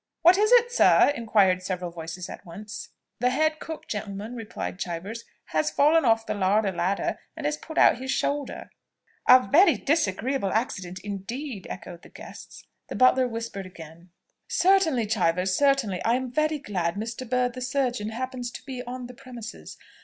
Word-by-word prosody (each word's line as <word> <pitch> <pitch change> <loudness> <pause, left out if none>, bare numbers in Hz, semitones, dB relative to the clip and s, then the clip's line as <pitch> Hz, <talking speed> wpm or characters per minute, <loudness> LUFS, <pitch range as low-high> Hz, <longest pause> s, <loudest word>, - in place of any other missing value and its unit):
"What 350 +2 +8
is 425 +3 +2
it, 480 0 +5
sir?" 290 - +5
inquired 200 -6 +2
several 180 -2 -4
voices 170 +2 -7
at - - -9
once. 210 +5 -9 0.3
"The 250 +1 +2
head 310 +4 +1
cook, 320 -1 -8
gentlemen," 210 +1 -5
replied 225 -5 -6
Chivers, 190 +7 -5 0.2
"has 155 -1 +1
fallen 305 +1 +4
off 225 -1 +3
the - - -2
larder 200 +1 +2
ladder, 180 +2 -1 0.2
and 310 - -5
has 295 0 +1
put 315 +1 -10
out - - +5
his 260 +1 -6
shoulder." 285 +1 -2 0.6
"A 255 -3 +8
very 350 - +5
disagreeable 260 - 0
accident 190 -5 -2
indeed," 205 +3 -6
echoed 175 -1 -8
the - - -15
guests. - - -12 0.2
The - - -6
butler 255 0 +4
whispered 225 -5 -5
again. 170 0 -13 0.4
"Certainly, 345 - +3
Chivers, 185 -3 +1
certainly. 275 -10 +2
I 230 - +3
am 255 -1 -3
very 305 +3 +1
glad 180 -10 -2
Mr. 225 +3 -5
Bird 250 0 +1
the 255 - -7
surgeon 250 -4 -1
happens 250 +1 -4
to - - -9
be 260 -2 -5
on 250 0 -6
the 250 - -10
premises. 235 -2 -10
230 Hz, 170 wpm, -26 LUFS, 190-265 Hz, 0.6 s, What